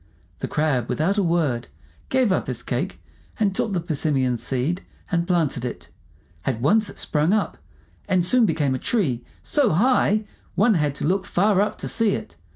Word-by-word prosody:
The - - -3
Crab, 145 -6 0
without 195 +7 +1
a - - +2
word, 160 -9 0 0.4
gave 260 -5 +2
up 185 - 0
his - - -3
cake, - - -3 0.4
and 205 -3 +2
took 210 - 0
the 185 - 0
persimmon 145 -6 0
seed 135 - -2 0.3
and 170 -1 +1
planted 165 -9 +1
it. 125 - -6 0.5
At 125 -4 -1
once 205 - +3
it - - -11
sprung 155 +5 +1
up, 215 - -1 0.5
and 180 -2 +3
soon 240 +3 +4
became 150 -5 +1
a 130 - -2
tree 135 - 0 0.2
so 285 -6 +2
high 215 +2 +3 0.3
one 215 +3 +4
had 150 -5 0
to - - -3
look 190 +2 0
far 200 +1 +3
up 210 - -1
to - - -5
see 225 -3 +2
it. 85 - -7
175 Hz, 180 wpm, -23 LUFS, 140-205 Hz, 0.5 s, soon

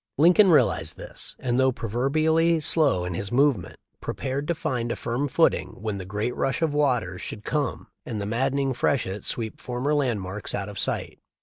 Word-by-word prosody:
Lincoln 180 +7 +6
realized 160 - +3
this - - -8
and, 125 0 0
though 130 0 +4
pro 115 - -6
verbially 155 +8 +2
slow 145 - +3
in 90 - -3
his 100 +3 -4
movements, 130 -7 +2 0.2
prepared 135 +2 -3
to 170 - 0
find 120 -5 -2
a - - -1
firm 120 +5 -2
footing 95 - +1
when 105 -1 -3
the 95 - -6
great 105 +5 -2
rush 135 +5 0
of 155 -3 +1
waters 125 -12 +1
should 105 - -6
come 145 -4 -1 0.2
and 110 -4 -4
the 100 - -3
maddening 135 +5 0
freshet 110 -6 0
sweep 110 -2 -3
former 125 +4 -1
landmarks 105 -8 -1
out 100 0 -3
of 100 - -6
sight. - - -3
125 Hz, 185 wpm, -25 LUFS, 105-145 Hz, 0.2 s, Lincoln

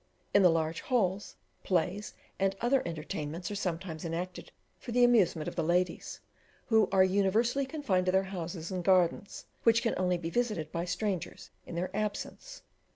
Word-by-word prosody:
In 200 - +6
the 180 - +7
large 165 0 0
halls 205 -6 0 0.3
plays 185 +3 -1 0.2
and 195 0 +1
other 255 +3 +2
entertainments 160 +2 -5
are - - -3
sometimes 175 -4 -3
enacted 175 +2 -5 0.3
for 245 - -7
the 245 +1 +4
amusement 195 -10 +4
of - - -5
the 170 - 0
ladies, 180 +3 0 0.5
who 220 -2 +4
are 190 -1 +5
universally 210 +8 +2
confined 250 - 0
to - - +4
their 190 +1 +3
houses 175 -2 -5
and 185 -1 -3
gardens, 185 +1 +2 0.2
which 230 0 +4
can 230 - +1
only 180 -1 +1
be 165 -1 -5
visited 210 -10 -1
by 170 +1 -2
strangers 190 -1 -3 0.2
in 170 - -7
their 180 +3 -3
absence. 215 - -4
185 Hz, 165 wpm, -30 LUFS, 170-215 Hz, 0.5 s, the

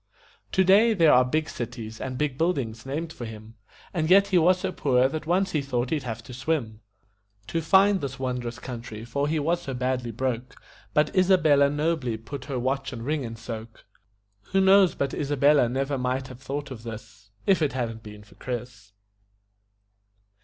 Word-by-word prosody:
Today 200 +5 +5
there 165 -5 +5
are 125 - +6
big 155 +5 -1
cities 110 -4 -6
and 130 -1 -4
big 150 -2 -1
buildings 135 -8 -1
named 160 +4 -4
for 120 - -7
him, 110 0 -10 0.4
And 160 -3 -1
yet 200 +2 +6
he 185 - +3
was 180 +2 +3
so 190 - -1
poor 130 -6 +2
that 155 +3 -5
once 190 +3 +1
he 150 - 0
thought 125 -3 -2
he'd 155 -2 0
have 115 -2 -6
to 125 - -11
swim 125 -5 -2 0.6
To 165 +8 -2
find 195 +4 +4
this 135 -2 -4
wondrous 125 -3 -3
country, 115 -3 -7
for 140 +5 -1
he 160 +2 0
was 165 +4 0
so 135 -6 -5
badly 125 -1 -1
broke; 125 +2 -3 0.4
But 150 +4 +2
Isabella 160 -7 +4
nobly 145 -5 -1
put 130 +4 -8
her 140 -3 -3
watch 135 +2 -1
and 115 -2 -7
ring 150 +1 -1
in 115 -1 -6
soak. 115 -1 -8 0.7
Who 195 - +4
knows 190 -1 +5
but 140 -1 -2
Isabella 145 -2 +3
never 135 +2 -1
might 130 +1 -2
have 125 0 -11
thought 140 +2 -5
of 120 -4 -7
this 105 -3 -10 0.2
If 190 -4 +3
it 145 -4 +1
hadn't 115 -3 -3
been 105 -1 -11
for 105 - -19
Chris? 115 -5 -7
135 Hz, 180 wpm, -26 LUFS, 120-155 Hz, 0.7 s, are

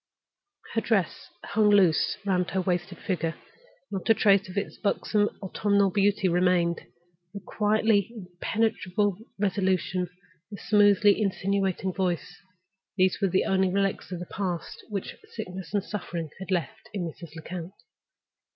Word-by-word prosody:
Her 225 - +1
dress 200 -8 0 0.2
hung 210 0 +2
loose 190 -6 +4
round 180 -2 +1
her 190 - 0
wasted 180 0 -2
figure; 165 -4 -2 0.6
not 195 +2 -4
a 225 - +7
trace 200 -3 +4
of 185 - -8
its 200 - -2
buxom 210 0 +1
autumnal 200 0 +2
beauty 200 0 +2
remained. 175 -1 +2 0.5
The - - -4
quietly 215 0 +1
impenetrable 200 0 -1 0.2
resolution, 185 -2 0 0.4
the 205 - -8
smoothly 205 0 +4
insinuating 195 -1 0
voice—these 185 +1 -3
were 195 - +3
the 190 +2 +2
only 190 -1 +2
relics 195 0 -1
of 180 - -3
the 175 - -6
past 180 -2 -4
which 200 -3 -4 0.2
sickness 185 - -6
and 200 -1 0
suffering 170 -7 -5
had 190 - -8
left 175 -6 -2
in 190 - -1
Mrs. 165 -1 -8
Lecount. 170 +3 -7
190 Hz, 135 wpm, -27 LUFS, 180-205 Hz, 0.6 s, a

